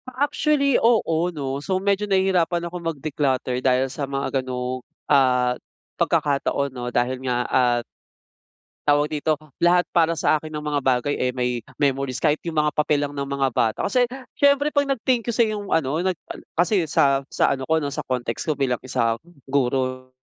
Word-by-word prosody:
Ah 255 +3 0
actually 290 -2 +2
oo, 180 -8 +2
'no. 140 -4 -4
So 185 +5 -1
medyo 200 +2 0
nahihirapan 180 -3 +2
akong 175 +1 -6
mag-declutter 140 -5 -1
dahil 130 0 +3
sa 135 +1 -5
mga 135 -1 -1
ganong, 125 0 -4 0.2
ah 125 -3 +3 0.4
pagkakataon 140 -1 0
'no, 125 -1 -4
dahil 125 +1 -1
nga 125 -2 -1
at 120 -2 +2 1.0
Tawag 145 +1 +3
dito 155 +1 0 0.2
lahat, 175 +1 +4
para 165 -1 +3
sa 155 0 +2
akin 155 - -8
ang 150 - -6
mga 145 -1 0
bagay 130 +2 +1
eh 125 - 0
may 125 -1 -1 0.2
memories 135 -2 0
kahit 150 +2 +1
yung 160 - -6
mga 150 0 +2
papel 150 -1 +1
lang 145 - -7
ng 140 -1 -4
mga 140 -1 +1
bata. 110 -2 +1
Kasi 245 +3 +2 0.2
siyempre 285 +1 +3
'pag 285 -1 +2
nag-thank 245 -2 0
you - - 0
sa'yo 215 -3 +1
yung 200 - -9
ano, 155 +1 +1
nag 185 -1 -1 0.2
ah, - - -11 0.2
kasi 175 -1 +2
sa 140 -2 +3
sa - - +2
ano 135 - -5
ko 160 - +4
'no, 145 -3 -2
sa - - -3
context 125 -2 -3
ko 155 - 0
bilang 130 -3 0
isang 115 -3 -1 0.2
guro 130 -1 -1
145 Hz, 180 wpm, -23 LUFS, 130-175 Hz, 1.0 s, lahat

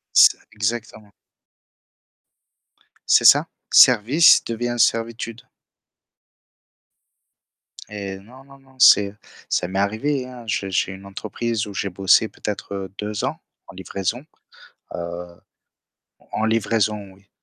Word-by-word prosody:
C'est - - +6
exactement. 110 -1 -4 2.0
C'est - - +5
ça, - - +6 0.2
«service» 125 +7 +6
devient 120 +1 -3
«servitude». 115 0 -1 2.5
Eh 100 -2 -7
non, 125 +7 -17
non, 140 0 -18
non, 135 -1 -25
c'est 100 -5 +6 0.3
ça 90 - 0
m'est 95 - -4
arrivé, 125 +7 -1
hein, 125 -2 -11
je 100 -2 -2
j'ai 95 0 -1
une 95 +1 -12
entreprise 110 +3 -4
où 100 - -8
j'ai 100 - -2
bossé 95 +4 +3
peut-être 100 -3 -6
2 105 0 -4
ans - - -3 0.3
en - - -14
livraison. 95 - -4 0.7
Heu 85 0 -7 0.9
en 110 - -1
livraison, 105 -2 -1
oui. 100 +1 -25
105 Hz, 110 wpm, -21 LUFS, 100-115 Hz, 2.5 s, C'est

